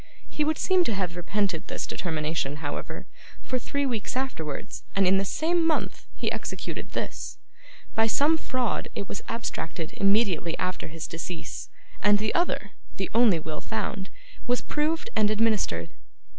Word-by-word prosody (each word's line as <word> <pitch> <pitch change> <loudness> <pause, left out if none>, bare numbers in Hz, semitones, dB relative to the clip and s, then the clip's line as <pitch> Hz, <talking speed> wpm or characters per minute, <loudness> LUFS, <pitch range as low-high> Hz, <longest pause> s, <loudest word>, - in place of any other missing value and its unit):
He 300 - 0
would 315 +1 +2
seem 370 -1 +4
to 225 - +1
have 180 -3 -1
repented 185 -1 0
this - - -2
determination, 155 -4 -1
however, 150 -1 -4 0.4
for 255 - -1
three 280 +3 0
weeks 240 -1 -1
afterwards, 165 - -3
and 195 0 +5
in 190 +1 +6
the - - +2
same 330 - +2
month, 325 -1 +1
he - - 0
executed - - -4
this. - - -3 0.6
By 225 0 +4
some 290 +8 +4
fraud, 255 -6 0
it 200 - -3
was - - -4
abstracted 165 -8 -3
immediately 195 -5 +3
after 185 0 -1
his 160 0 -6
decease, 165 +1 -5 0.3
and 205 0 +6
the 215 +1 0
other 275 - +1 0.3
the 190 - -2
only 225 -6 +6
will 155 -1 -4
found 205 -3 -2 0.4
was 245 0 +3
proved 320 +10 0
and 210 -1 +5
administered. 210 - +2
205 Hz, 155 wpm, -28 LUFS, 175-255 Hz, 0.6 s, in